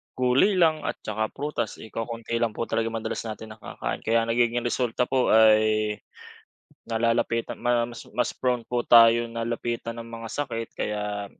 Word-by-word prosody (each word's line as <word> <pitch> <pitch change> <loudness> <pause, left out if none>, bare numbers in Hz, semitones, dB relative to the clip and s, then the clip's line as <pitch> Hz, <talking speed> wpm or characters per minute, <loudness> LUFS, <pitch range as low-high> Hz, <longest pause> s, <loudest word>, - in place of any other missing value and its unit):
gulay 130 +11 +3
lang, 160 -3 +3
at - - -2
saka 110 +1 -2
prutas, 145 -5 -4
eh, 110 - -12
kokonti 115 0 -4
lang 115 -2 0
po - - -2
talaga 115 0 -1
madalas 115 -1 -3
natin 110 0 -7
na 110 - -12
kakain. - - -5
Kaya 115 +1 +1
nagiging 120 +1 +1
resulta 120 0 0
po 130 0 +1
ay 110 -1 +4 0.9
nalalapitan 115 0 0
ma 120 0 +1
mas 115 - -10
mas 125 - +1
prone 125 -2 0
po 120 -1 -1
tayo 115 0 +7
na 115 0 -5
lapitan 115 0 -3
ng 115 - -7
mga 115 0 -8
sakit. 115 -6 -3
Kaya 105 -1 -3
115 Hz, 170 wpm, -25 LUFS, 110-120 Hz, 0.9 s, tayo